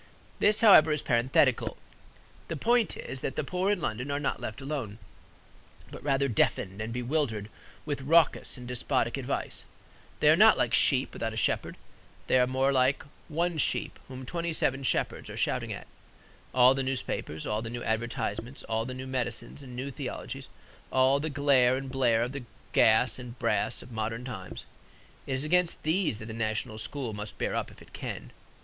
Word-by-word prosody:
This, 210 Hz, +2 st, +3 dB
however, 175 Hz, -8 st, +8 dB
is 150 Hz, -, -1 dB
parenthetical. 125 Hz, +1 st, +2 dB, 0.7 s
The 165 Hz, -, -3 dB
point 235 Hz, -, +2 dB
is, 130 Hz, -, -6 dB
that 135 Hz, -, -3 dB
the -, -, -1 dB
poor 180 Hz, +6 st, 0 dB
in 205 Hz, -, +1 dB
London 125 Hz, +1 st, -3 dB
are 140 Hz, 0 st, -1 dB
not 145 Hz, -, -1 dB
left 110 Hz, -, -5 dB
alone, 135 Hz, -7 st, -4 dB, 0.9 s
but -, -, -9 dB
rather 140 Hz, -1 st, +1 dB
deafened 105 Hz, -4 st, 0 dB
and 110 Hz, +1 st, -4 dB
bewildered 120 Hz, -4 st, -1 dB, 0.4 s
with 145 Hz, -2 st, -3 dB
raucous 155 Hz, +1 st, +3 dB
and 125 Hz, -1 st, -9 dB
despotic 125 Hz, -1 st, 0 dB
advice. -, -, -3 dB, 0.6 s
They -, -, +6 dB
are -, -, +6 dB
not -, -, +7 dB
like -, -, +1 dB
sheep -, -, +3 dB
without -, -, -3 dB
a -, -, -6 dB
shepherd. -, -, 0 dB, 0.5 s
They 130 Hz, -, +4 dB
are 125 Hz, -, +4 dB
more 130 Hz, +1 st, +2 dB
like 130 Hz, 0 st, +2 dB, 0.2 s
one 170 Hz, +1 st, -1 dB
sheep -, -, 0 dB
whom 130 Hz, 0 st, -8 dB
twenty 170 Hz, +4 st, -2 dB
seven 135 Hz, -3 st, 0 dB
shepherds 130 Hz, -, -1 dB
are -, -, -7 dB
shouting -, -, -1 dB
at. -, -, -6 dB, 0.7 s
All 125 Hz, +1 st, +6 dB
the 135 Hz, -, -1 dB
newspapers, 130 Hz, -, -3 dB
all 105 Hz, +1 st, -1 dB
the 115 Hz, -, -5 dB
new 120 Hz, +1 st, -5 dB
advertisements, 115 Hz, +1 st, -3 dB
all 110 Hz, 0 st, -1 dB
the 130 Hz, +1 st, -5 dB
new 130 Hz, +1 st, -6 dB
medicines 125 Hz, 0 st, -4 dB
and 125 Hz, -3 st, -10 dB
new 135 Hz, +3 st, -4 dB
theologies, -, -, -6 dB, 0.4 s
all 130 Hz, +2 st, +4 dB
the 155 Hz, +2 st, -2 dB
glare 135 Hz, -3 st, +4 dB
and 135 Hz, -1 st, -6 dB
blare 120 Hz, -4 st, +3 dB
of 125 Hz, -, -3 dB
the 135 Hz, -2 st, -6 dB, 0.3 s
gas 110 Hz, +2 st, +4 dB
and 125 Hz, 0 st, -9 dB
brass -, -, 0 dB
of 125 Hz, -, -13 dB
modern 115 Hz, +2 st, -3 dB
times 95 Hz, -8 st, -7 dB, 0.6 s
it 135 Hz, -, -1 dB
is 130 Hz, -, -2 dB
against 180 Hz, +2 st, +1 dB
these 160 Hz, -, +1 dB
that 110 Hz, -, -8 dB
the 110 Hz, -, -7 dB
national 110 Hz, -1 st, -2 dB
school 125 Hz, -1 st, -4 dB
must 105 Hz, 0 st, -7 dB
bear -, -, -1 dB
up -, -, -2 dB
if -, -, -15 dB
it -, -, -21 dB
can. -, -, -6 dB
130 Hz, 185 wpm, -29 LUFS, 115-145 Hz, 0.9 s, however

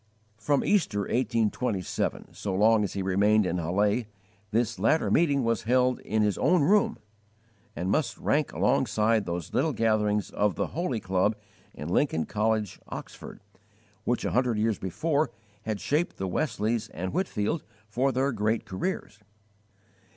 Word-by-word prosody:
From 140 Hz, +6 st, +1 dB
Easter, 165 Hz, -, +2 dB
1827, 115 Hz, -3 st, -1 dB
so 100 Hz, -2 st, -3 dB
long 110 Hz, +2 st, +4 dB
as 100 Hz, -, -3 dB
he 100 Hz, -, -2 dB
remained 100 Hz, +3 st, +3 dB
in 90 Hz, 0 st, -1 dB
Halle, 100 Hz, +7 st, +1 dB, 0.4 s
this 110 Hz, -2 st, 0 dB
latter 115 Hz, +11 st, +2 dB
meeting 145 Hz, -5 st, +3 dB
was 115 Hz, -2 st, 0 dB
held 125 Hz, +1 st, +2 dB
in 110 Hz, 0 st, 0 dB
his 105 Hz, -2 st, 0 dB
own 165 Hz, +2 st, +3 dB
room, 205 Hz, +6 st, +3 dB, 0.8 s
and 90 Hz, +3 st, -2 dB
must 155 Hz, +6 st, 0 dB
rank 150 Hz, -1 st, 0 dB
alongside 110 Hz, -5 st, +1 dB
those 85 Hz, -2 st, -4 dB
little 160 Hz, -, +1 dB
gatherings 105 Hz, -2 st, +1 dB
of 105 Hz, -2 st, +1 dB
the -, -, -2 dB
"Holy 155 Hz, -9 st, -1 dB
Club" 95 Hz, +2 st, +1 dB, 0.4 s
in 75 Hz, -, -6 dB
Lincoln 85 Hz, -, +1 dB
College, 110 Hz, -1 st, -1 dB
Oxford, -, -, -9 dB, 0.6 s
which 120 Hz, +1 st, -1 dB
a -, -, 0 dB
hundred 125 Hz, -2 st, +1 dB
years 110 Hz, -1 st, +1 dB
before 150 Hz, -, 0 dB, 0.4 s
had 110 Hz, -2 st, -2 dB
shaped 150 Hz, -, -1 dB
the 95 Hz, -, -3 dB
Wesleys 115 Hz, -, -1 dB
and 90 Hz, +3 st, -5 dB
Whitefield 165 Hz, -, -1 dB, 0.2 s
for 125 Hz, +5 st, +1 dB
their 135 Hz, +2 st, +1 dB
great 110 Hz, 0 st, 0 dB
careers. 105 Hz, -, -4 dB
110 Hz, 145 wpm, -27 LUFS, 100-130 Hz, 0.8 s, long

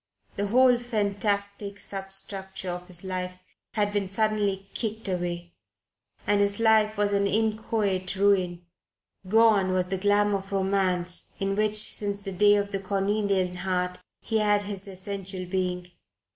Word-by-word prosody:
The 205 Hz, +1 st, -1 dB
whole 250 Hz, +2 st, +5 dB
fantastic 200 Hz, -3 st, -1 dB
substructure 195 Hz, -1 st, -4 dB
of 180 Hz, 0 st, -6 dB
his 175 Hz, 0 st, +2 dB
life 180 Hz, -1 st, -3 dB, 0.4 s
had 205 Hz, -1 st, +1 dB
been 205 Hz, -2 st, 0 dB
suddenly 200 Hz, -1 st, 0 dB
kicked 220 Hz, -1 st, -3 dB
away, 175 Hz, -2 st, -3 dB, 0.7 s
and 205 Hz, 0 st, +3 dB
his 200 Hz, +1 st, +1 dB
life 220 Hz, -1 st, +4 dB
was 205 Hz, 0 st, +1 dB
an 200 Hz, 0 st, +2 dB
inchoate 210 Hz, -3 st, 0 dB
ruin. 185 Hz, -3 st, +2 dB, 0.6 s
Gone 220 Hz, -3 st, +5 dB
was 185 Hz, -1 st, 0 dB
the 190 Hz, -1 st, -2 dB
glamour 205 Hz, 0 st, +3 dB
of 195 Hz, +1 st, -13 dB
romance 190 Hz, -2 st, 0 dB
in 195 Hz, 0 st, 0 dB
which 215 Hz, 0 st, +1 dB
since 205 Hz, -1 st, +1 dB
the 195 Hz, -1 st, -5 dB
day 205 Hz, +2 st, +5 dB
of 200 Hz, 0 st, -1 dB
the 195 Hz, -, -1 dB
cornelian 195 Hz, -1 st, 0 dB
heart 180 Hz, 0 st, -1 dB, 0.2 s
he 225 Hz, -1 st, 0 dB
had 210 Hz, -1 st, +3 dB
had 200 Hz, -, -4 dB
his 200 Hz, -1 st, -6 dB
essential 190 Hz, -1 st, -6 dB
being. 180 Hz, -1 st, -2 dB
200 Hz, 145 wpm, -26 LUFS, 185-205 Hz, 0.7 s, whole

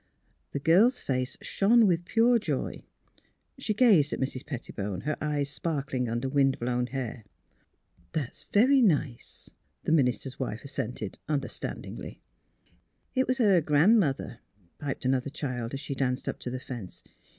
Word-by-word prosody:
The 140 Hz, -, -2 dB
girl's 195 Hz, -, +4 dB
face 130 Hz, -1 st, -2 dB
shone 225 Hz, +3 st, +4 dB
with 175 Hz, -3 st, +2 dB
pure 235 Hz, +4 st, +4 dB
joy; -, -, -3 dB, 0.7 s
she 220 Hz, -5 st, -1 dB
gazed 200 Hz, -, +5 dB
at -, -, -3 dB
Mrs. 130 Hz, 0 st, -2 dB
Pettibone, 105 Hz, -, -5 dB
her 150 Hz, +1 st, -1 dB
eyes 145 Hz, -2 st, -1 dB
sparkling 140 Hz, -7 st, -2 dB
under 120 Hz, +3 st, -1 dB
wind 135 Hz, 0 st, +2 dB
blown 125 Hz, 0 st, -1 dB
hair. 125 Hz, -3 st, -5 dB, 0.4 s
'' 85 Hz, -1 st, -36 dB
That 145 Hz, -6 st, -2 dB
is -, -, -15 dB
very 260 Hz, +6 st, +5 dB
nice," 150 Hz, -, 0 dB, 0.3 s
the -, -, -1 dB
minister's 130 Hz, -4 st, +1 dB
wife 120 Hz, -4 st, -3 dB
as 140 Hz, -, -8 dB
sented, 110 Hz, -3 st, -4 dB
understandingly. 145 Hz, -2 st, -4 dB, 0.5 s
" -, -, -35 dB, 0.3 s
It 260 Hz, 0 st, +1 dB
was 255 Hz, -, +1 dB
her 200 Hz, -8 st, +5 dB
Gran 160 Hz, +10 st, +5 dB
'mother," 135 Hz, -, -1 dB, 0.4 s
piped 140 Hz, -3 st, -4 dB
another 130 Hz, +1 st, +1 dB
child, 130 Hz, -4 st, -4 dB
as -, -, -4 dB
she 140 Hz, -, -4 dB
danced 125 Hz, -2 st, -1 dB
up -, -, -3 dB
to -, -, -4 dB
the 130 Hz, +1 st, -4 dB
fence. 120 Hz, -8 st, -8 dB
140 Hz, 160 wpm, -28 LUFS, 125-175 Hz, 0.7 s, gazed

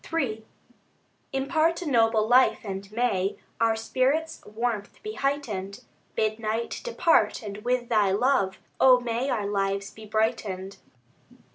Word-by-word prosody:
III 245 Hz, -10 st, -1 dB, 0.9 s
Impart 315 Hz, +6 st, +1 dB
a -, -, -7 dB
noble 225 Hz, -5 st, +3 dB
life, 255 Hz, +2 st, +4 dB
and 195 Hz, -1 st, -6 dB
may 210 Hz, -5 st, 0 dB, 0.2 s
Our 225 Hz, -1 st, +3 dB
spirit's 265 Hz, +8 st, 0 dB
warmth 215 Hz, -1 st, -3 dB
be 430 Hz, 0 st, -5 dB
heightened. 230 Hz, -, -3 dB, 0.3 s
Bid 215 Hz, 0 st, 0 dB
night 225 Hz, +1 st, -3 dB
depart, 335 Hz, -, +2 dB
and 200 Hz, -1 st, -6 dB
with 245 Hz, +2 st, -1 dB
Thy 210 Hz, -4 st, +3 dB
love, 200 Hz, -2 st, +2 dB, 0.2 s
O 255 Hz, -1 st, +7 dB
may 245 Hz, +2 st, -2 dB
our 215 Hz, -6 st, -1 dB
lives 200 Hz, 0 st, -1 dB
be 220 Hz, -1 st, -12 dB
brightened. 210 Hz, -3 st, -1 dB
225 Hz, 130 wpm, -26 LUFS, 205-260 Hz, 0.9 s, O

